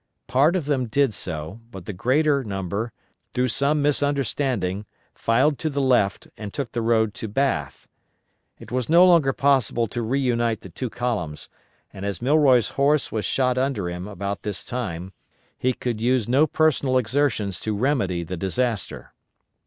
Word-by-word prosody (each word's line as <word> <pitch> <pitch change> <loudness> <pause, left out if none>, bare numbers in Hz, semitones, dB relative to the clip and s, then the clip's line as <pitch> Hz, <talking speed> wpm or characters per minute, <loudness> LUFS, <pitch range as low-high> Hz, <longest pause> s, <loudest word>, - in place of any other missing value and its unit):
Part 145 +7 +3
of 175 -6 -1
them 135 -4 0
did 135 +1 +2
so, 80 +2 -5
but 95 -6 -10
the 105 - -5
greater 140 - +2
number, 100 +2 -3 0.4
through 125 0 +1
some 140 +5 +1
misunderstanding, 135 -9 0 0.3
filed 130 +6 +2
to 160 - -1
the 140 -1 -2
left, 125 -7 +2
and 105 -2 -6
took 135 -2 -4
the 120 - -2
road 110 -2 +2
to 110 - -6
Bath. 105 - -1 0.7
It - - -13
was 125 +1 -1
no 170 +3 +7
longer 170 -7 +5
possible 135 -5 +2
to 120 - -3
reunite 120 -2 0
the 95 - -11
two 125 +8 -4
columns 105 -12 -3 0.4
and 95 - -8
as 100 -3 -3
Milroy's 130 -4 +4
horse 140 +1 +1
was 110 -1 -2
shot 125 -1 +1
under 130 -9 -1
him 90 +2 -6
about 100 -1 -4
this 100 -2 -4
time, 95 -7 -5 0.4
he 130 - 0
could 120 -3 -4
use 125 -2 +2
no 135 +6 +4
personal 145 -4 +2
exertions 120 -6 0
to 110 -2 -3
remedy 100 -9 0
the 90 +2 -5
disaster. 110 +4 -2
120 Hz, 160 wpm, -23 LUFS, 100-140 Hz, 0.7 s, no